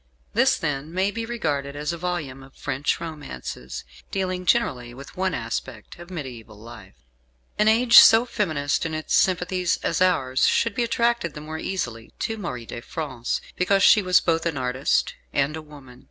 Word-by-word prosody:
This, -, -, +3 dB
then, 145 Hz, +2 st, -3 dB
may 190 Hz, +3 st, 0 dB
be 225 Hz, +1 st, -4 dB
regarded 145 Hz, -12 st, -2 dB
as 150 Hz, +3 st, -2 dB
a -, -, -5 dB
volume 160 Hz, -7 st, -3 dB
of 135 Hz, 0 st, -16 dB
French 140 Hz, +3 st, -1 dB
romances, 145 Hz, -, -7 dB, 0.3 s
dealing, 185 Hz, -2 st, -3 dB
generally, 125 Hz, -, +1 dB
with 140 Hz, +2 st, -11 dB
one 190 Hz, 0 st, 0 dB
aspect 115 Hz, +3 st, -6 dB
of 175 Hz, +1 st, -11 dB
mediaeval 125 Hz, -, -8 dB
life. 110 Hz, -3 st, -12 dB, 0.6 s
An 210 Hz, -, +4 dB
age 235 Hz, +2 st, +8 dB
so 225 Hz, +2 st, +7 dB
feminist 155 Hz, -12 st, -1 dB
in 160 Hz, -1 st, -3 dB
its 155 Hz, -, -3 dB
sympathies 180 Hz, -1 st, +2 dB
as 170 Hz, -, 0 dB
ours 135 Hz, -8 st, +3 dB
should 230 Hz, -2 st, +2 dB
be 240 Hz, -, 0 dB
attracted 235 Hz, -6 st, 0 dB
the 150 Hz, -, -7 dB
more 155 Hz, +1 st, -6 dB
easily 120 Hz, -14 st, -4 dB
to 225 Hz, -1 st, -3 dB
Marie 125 Hz, -, -5 dB
de 120 Hz, -, -7 dB
France, 130 Hz, -5 st, -4 dB
because 195 Hz, +2 st, +2 dB
she 215 Hz, -, +7 dB
was 185 Hz, -1 st, +4 dB
both 165 Hz, 0 st, +1 dB
an 160 Hz, -4 st, -2 dB
artist 130 Hz, +2 st, 0 dB, 0.2 s
and 140 Hz, +2 st, +1 dB
a 160 Hz, -, -6 dB
woman. 140 Hz, -5 st, -14 dB
155 Hz, 175 wpm, -24 LUFS, 130-185 Hz, 0.6 s, age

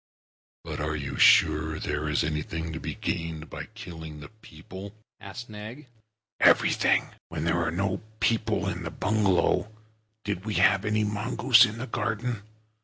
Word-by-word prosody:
"But -, -, -6 dB
are 75 Hz, +1 st, -1 dB
you 70 Hz, -2 st, -4 dB
sure 80 Hz, 0 st, +5 dB
that -, -, -6 dB
there 75 Hz, +1 st, -2 dB
is 75 Hz, -, +1 dB
anything 80 Hz, +1 st, -3 dB
to 80 Hz, -, -4 dB
be -, -, -5 dB
gained 80 Hz, -1 st, -4 dB
by -, -, -6 dB
killing 85 Hz, -9 st, -9 dB
the 75 Hz, -, -10 dB
people?" 95 Hz, 0 st, -11 dB, 0.3 s
said 120 Hz, +5 st, -8 dB
Nag. 110 Hz, +7 st, -9 dB, 0.5 s
"Everything. -, -, +4 dB, 0.2 s
When 80 Hz, -2 st, -4 dB
there 85 Hz, +1 st, +1 dB
were 85 Hz, -, 0 dB
no 95 Hz, +3 st, -1 dB, 0.2 s
people 115 Hz, -1 st, +1 dB
in -, -, -3 dB
the -, -, -4 dB
bungalow, 105 Hz, 0 st, +1 dB, 0.5 s
did 100 Hz, -3 st, -3 dB
we 105 Hz, -2 st, -3 dB
have 95 Hz, +3 st, +4 dB
any 105 Hz, 0 st, +1 dB
mongoose 115 Hz, +3 st, +4 dB
in 110 Hz, 0 st, -5 dB
the 120 Hz, -, -4 dB
garden? 115 Hz, -1 st, -2 dB
100 Hz, 160 wpm, -27 LUFS, 80-110 Hz, 0.5 s, sure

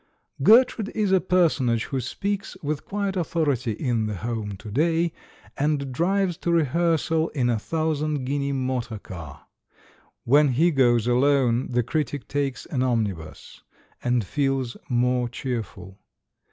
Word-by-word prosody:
'* -, -, -18 dB
Gertrude 230 Hz, -3 st, +5 dB
is 210 Hz, -3 st, +1 dB
a 190 Hz, -1 st, +4 dB
personage 145 Hz, -11 st, +2 dB
who 135 Hz, -, -3 dB
speaks 200 Hz, -, -3 dB
with 150 Hz, 0 st, -3 dB
quiet 200 Hz, -1 st, -2 dB
authority 145 Hz, -, 0 dB
in 115 Hz, -2 st, -1 dB
the 105 Hz, -, -3 dB
home 105 Hz, -1 st, -4 dB
to 105 Hz, +2 st, -10 dB
day, 165 Hz, +6 st, +1 dB, 0.4 s
and 140 Hz, -2 st, 0 dB
drives 180 Hz, +3 st, +1 dB
to 170 Hz, -, -2 dB
re 165 Hz, -2 st, +3 dB
hearsal 160 Hz, +1 st, +1 dB
in 120 Hz, -3 st, +2 dB
a 115 Hz, -, 0 dB
thousand 155 Hz, -1 st, -1 dB
guinea 140 Hz, +1 st, -1 dB
motor 130 Hz, -4 st, -2 dB
car. 80 Hz, -8 st, -10 dB, 0.8 s
When 140 Hz, +2 st, +4 dB
he 165 Hz, +7 st, +3 dB
goes 120 Hz, -5 st, +3 dB
alone, 125 Hz, -1 st, +2 dB
the 120 Hz, -1 st, +1 dB
critic 145 Hz, +1 st, -2 dB
takes 140 Hz, -2 st, -2 dB
an 130 Hz, -, -2 dB
omnibus, 105 Hz, -11 st, -3 dB, 0.4 s
and 120 Hz, -3 st, +1 dB
feels 135 Hz, -, -1 dB
more 125 Hz, 0 st, +1 dB
cheerful. 105 Hz, -7 st, -6 dB
135 Hz, 140 wpm, -24 LUFS, 120-160 Hz, 0.8 s, Gertrude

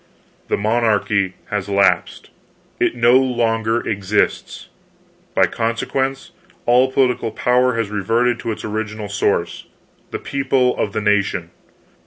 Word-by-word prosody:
The -, -, 0 dB
monarchy 105 Hz, -3 st, +1 dB, 0.2 s
has 100 Hz, -1 st, -2 dB
lapsed, 100 Hz, 0 st, +1 dB, 0.5 s
it -, -, +1 dB
no 120 Hz, +1 st, +5 dB
longer 115 Hz, -3 st, 0 dB
exists. 100 Hz, 0 st, -1 dB, 0.7 s
By -, -, +5 dB
consequence, 135 Hz, +6 st, -2 dB, 0.3 s
all 125 Hz, +2 st, +4 dB
political 125 Hz, -3 st, +1 dB
power 125 Hz, +2 st, +1 dB
has 115 Hz, -3 st, -2 dB
reverted 115 Hz, +4 st, +1 dB
to 115 Hz, -, -3 dB
its 110 Hz, -, -6 dB
original 110 Hz, -1 st, -4 dB
source, 100 Hz, -4 st, -1 dB, 0.4 s
the -, -, -4 dB
people 135 Hz, -2 st, 0 dB
of 100 Hz, -, -2 dB
the 110 Hz, -, -1 dB
nation. 105 Hz, -1 st, 0 dB
115 Hz, 120 wpm, -19 LUFS, 105-125 Hz, 0.7 s, no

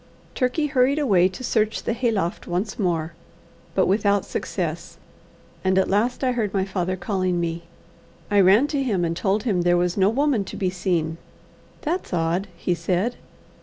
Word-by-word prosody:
Turkey 260 Hz, +4 st, 0 dB
hurried 275 Hz, -1 st, +2 dB
away 195 Hz, -12 st, +4 dB
to 190 Hz, +7 st, -9 dB
search 220 Hz, -3 st, 0 dB
the -, -, -1 dB
hayloft 220 Hz, -7 st, -1 dB
once 185 Hz, +6 st, -2 dB
more, 170 Hz, -4 st, -1 dB, 0.6 s
but -, -, +4 dB
without 200 Hz, 0 st, +2 dB
success; -, -, -4 dB, 0.7 s
and 190 Hz, 0 st, +2 dB
at 190 Hz, -, +2 dB
last 230 Hz, +7 st, +1 dB
I 255 Hz, -, +2 dB
heard 215 Hz, -5 st, -2 dB
my 190 Hz, -1 st, +1 dB
father 185 Hz, -1 st, -2 dB
calling 185 Hz, -2 st, -1 dB
me. 170 Hz, 0 st, -3 dB, 0.7 s
I 205 Hz, -, +4 dB
ran 195 Hz, +8 st, +6 dB
to 285 Hz, -2 st, 0 dB
him, 200 Hz, -10 st, 0 dB
and 165 Hz, 0 st, -1 dB
told 200 Hz, +3 st, 0 dB
him 200 Hz, -8 st, +1 dB
there 175 Hz, 0 st, +3 dB
was 175 Hz, +1 st, 0 dB
no 195 Hz, 0 st, +4 dB
woman 265 Hz, -2 st, +1 dB
to -, -, -8 dB
be 185 Hz, -2 st, -1 dB
seen. 170 Hz, -3 st, -1 dB, 0.6 s
"That's 335 Hz, -, -2 dB
odd," 170 Hz, +4 st, 0 dB
he 180 Hz, -, 0 dB
said. 185 Hz, +7 st, -1 dB
195 Hz, 170 wpm, -23 LUFS, 175-230 Hz, 0.7 s, ran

